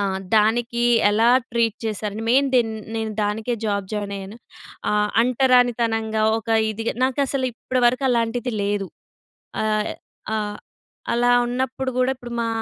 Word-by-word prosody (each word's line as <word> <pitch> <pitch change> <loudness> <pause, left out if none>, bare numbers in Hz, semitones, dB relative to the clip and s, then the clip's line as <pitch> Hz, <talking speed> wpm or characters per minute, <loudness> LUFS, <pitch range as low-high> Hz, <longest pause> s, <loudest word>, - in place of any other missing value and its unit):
ఆ! - - +1 0.3
దానికీ 235 +2 +2 0.3
ఎలా 225 +3 +3 0.2
ట్రీట్ 230 -2 +1
చేశారని 215 0 -3
మెయిన్ 275 +2 +4
దెన్ 230 -3 +3 0.2
నేను 220 -1 -2
దానికే 220 +4 -1
జాబ్ 200 -2 -1
జాయినయ్యాను. 200 0 -5 0.5
ఆహ్, 210 0 +1
అంటరానితనంగా, 240 -3 +2 0.2
ఒక 225 - -12 0.2
ఇదిగ, 225 +2 -4 0.2
నాకసలు 265 0 0
ఇప్పడ 255 +2 -3
వరకు 255 +3 +1
అలాంటిది 240 +1 0
లేదు. 200 -1 -1 0.8
ఆహ్, 215 -1 0 0.4
ఆహ్, 210 -1 -3 0.6
అలా 245 +1 +3
ఉన్నప్పుడు 260 +1 -2
గూడా 255 +1 +2
ఇప్పుడు 240 -1 -9
మా 230 - -1
230 Hz, 130 wpm, -22 LUFS, 215-245 Hz, 0.8 s, మెయిన్